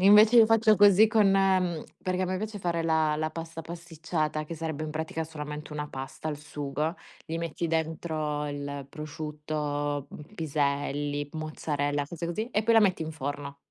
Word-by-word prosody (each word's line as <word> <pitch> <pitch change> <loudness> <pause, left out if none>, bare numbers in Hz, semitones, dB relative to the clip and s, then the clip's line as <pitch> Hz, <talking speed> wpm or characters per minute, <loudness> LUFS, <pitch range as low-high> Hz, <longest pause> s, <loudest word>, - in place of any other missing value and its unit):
Invece 210 +4 +8
io 230 - +10
faccio 225 -1 +5
così 205 +1 +7
con, 210 -3 +4
ehm 185 -4 +2 0.2
perché 185 0 +1
a - - +2
me 185 +1 -1
piace 215 +2 -4
fare 170 -3 -1
la 160 -2 +2
la 155 +1 -1
pasta 165 0 -6
pasticciata, 160 -2 -3
che 165 - -6
sarebbe 160 -1 -3
in 155 - -4
pratica 160 +1 -3
solamente 150 -1 -7
una 150 0 -4
pasta 135 +4 -6
al 150 - -2
sugo. 150 +1 -3 0.3
Gli 165 +1 -3
metti 170 0 -2
dentro 155 -2 -1
il 145 -1 -5
prosciutto, 150 -2 -3
uhm, 150 +7 -11
piselli, 145 -2 -1
mozzarella, 145 -2 -2
cose 170 +2 -5
così, 215 +8 -3
e 210 - +1
poi 230 +1 +3
la 225 - +8
metti 190 -5 +3
in 160 - -4
forno. 140 -1 -5
155 Hz, 175 wpm, -28 LUFS, 150-175 Hz, 0.3 s, io